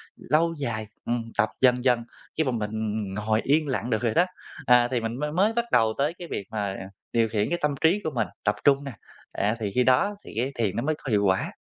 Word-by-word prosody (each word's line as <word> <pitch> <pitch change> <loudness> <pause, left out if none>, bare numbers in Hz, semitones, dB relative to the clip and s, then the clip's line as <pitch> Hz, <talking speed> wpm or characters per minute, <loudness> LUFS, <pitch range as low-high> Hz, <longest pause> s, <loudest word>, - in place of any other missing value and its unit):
lâu 165 +2 +1
dài, 110 -6 -3 0.2
ừm, 120 -1 -1
tập 110 -2 +3
dần 125 -1 +4
dần, 125 -2 +3 0.3
khi 160 - +3
mà 130 - 0
mình 105 -3 -2 0.4
ngồi 110 +2 0
yên 150 +2 +2
lặng 130 -3 -2
được 110 -3 0
rồi 115 -2 +1
đó, 175 - +4 0.4
à, 125 -1 +6
thì 125 -2 0
mình 115 +3 -3
mới 150 +1 -2
mới 195 +7 +2
bắt 235 +1 0
đầu 115 -2 +4
tới 145 +4 +1
cái 175 - -7
việc 100 - -4
mà 100 -3 -2 0.4
điều 115 -1 +3
khiển 105 -1 0
cái 175 - 0
tâm 150 -1 +1
trí 175 +6 +4
của 155 - -2
mình 120 - +1 0.2
tập 105 - +2
trung 140 0 +4
nè, 140 - -5 0.4
à, 105 +3 0
thì 105 -3 -2
khi 125 - +4
đó 130 +12 +3
thì - - -10
cái 130 +4 0
thiền 105 -5 0
nó 120 - -1
mới 155 +2 0
có 135 - -4
hiệu 105 -1 +3
quả. 95 -1 +1
125 Hz, 245 wpm, -26 LUFS, 110-150 Hz, 0.4 s, à